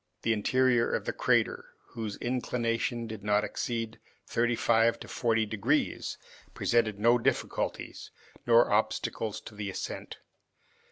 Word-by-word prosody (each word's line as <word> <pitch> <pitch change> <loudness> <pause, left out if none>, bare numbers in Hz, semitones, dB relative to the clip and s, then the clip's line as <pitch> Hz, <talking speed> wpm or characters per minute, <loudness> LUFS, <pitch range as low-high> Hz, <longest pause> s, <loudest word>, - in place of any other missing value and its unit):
The 115 - +3
interior 120 +2 +2
of - - -1
the - - -2
crater, - - 0
whose 110 -3 -5
inclination 120 -1 -1
did 110 -2 -7
not 105 0 +2
exceed 115 -2 -3 0.3
thirty 120 0 +1
five 115 0 +3
to - - -8
forty 115 -2 +1
degrees, 105 -1 0 0.4
presented 110 -4 +1
no 120 +3 +4
difficulties - - -2 0.4
nor 120 0 +5
obstacles 110 0 0
to 110 - -11
the 105 -1 -4
ascent. 95 - -6
115 Hz, 125 wpm, -29 LUFS, 110-120 Hz, 0.4 s, nor